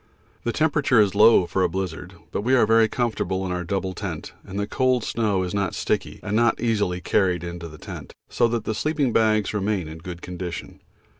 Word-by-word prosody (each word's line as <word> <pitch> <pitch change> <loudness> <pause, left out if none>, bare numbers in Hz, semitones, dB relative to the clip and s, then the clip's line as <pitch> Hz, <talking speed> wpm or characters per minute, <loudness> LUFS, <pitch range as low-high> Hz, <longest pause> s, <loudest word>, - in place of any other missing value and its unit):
The 120 - +1
temperature 145 -4 +2
is 100 -3 +4
low 105 -2 +6
for 95 - -1
a 90 - +3
blizzard, 90 -2 -5 0.2
but - - -2
we 125 +5 +3
are 120 - +5
very 115 0 +5
comfortable 110 -5 -1
in 90 - -3
our 90 0 -2
double 95 +1 -2
tent - - -6
and 95 +2 -6
the 100 - 0
cold 130 +2 +1
snow 105 -5 0
is 90 - -4
not 100 -2 -1
sticky - - -2
and 105 - -2
not 115 0 +3
easily 105 -6 0
carried 90 -4 +1
into 85 -1 -6
the 75 -1 -11
tent, - - -9 0.2
so 120 - +2
that 115 -1 -2
the 110 - -2
sleeping 145 0 0
bags 110 -2 +2
remain 100 -4 -1
in 80 +1 -8
good 85 +1 -8
condition. 90 -2 -6
100 Hz, 210 wpm, -24 LUFS, 90-115 Hz, 0.2 s, low